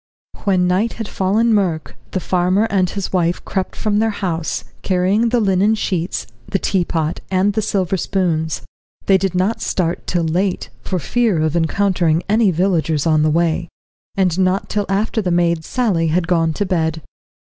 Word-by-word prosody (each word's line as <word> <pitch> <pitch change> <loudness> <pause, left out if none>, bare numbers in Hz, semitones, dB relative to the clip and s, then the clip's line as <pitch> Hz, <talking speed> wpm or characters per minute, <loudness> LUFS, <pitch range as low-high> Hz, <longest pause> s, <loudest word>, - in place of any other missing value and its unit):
When 185 -3 +3
night 195 +6 +1
had 225 -2 -5
fallen 215 +5 +1
murk, 180 -7 0
the 185 - -2
farmer 185 +3 +1
and 185 -2 +2
his 195 0 -4
wife 175 -1 0
crept 190 -2 -3
from 210 -1 0
their 225 +1 +2
house, 175 -6 -2 0.2
carrying 195 +5 +2
the 245 +1 +2
linen 200 +1 +3
sheets, 185 -4 -2 0.2
the - - 0
teapot, 170 -4 -1
and 190 +2 +2
the 220 - 0
silver 190 -2 0
spoons. 165 -4 -1 0.4
They 195 -1 +4
did 190 -2 -1
not 190 +5 0
start 175 -2 -1
till 175 -2 0
late, 180 +4 -1
for 185 - -2
fear 220 +1 +1
of 155 +1 0
encountering 170 -1 +1
any 215 +1 +3
villagers 165 -4 +1
on 155 -2 +3
the 155 - +3
way, 170 +1 +1 0.5
and 185 -2 +1
not 185 +1 +1
till 205 -1 -1
after 215 +3 0
the 185 - -1
maid, 170 -2 +1
Sally, 195 -7 0
had 165 +2 +1
gone 165 -2 +2
to 205 - -1
bed. 160 -4 -1
185 Hz, 170 wpm, -19 LUFS, 170-200 Hz, 0.5 s, They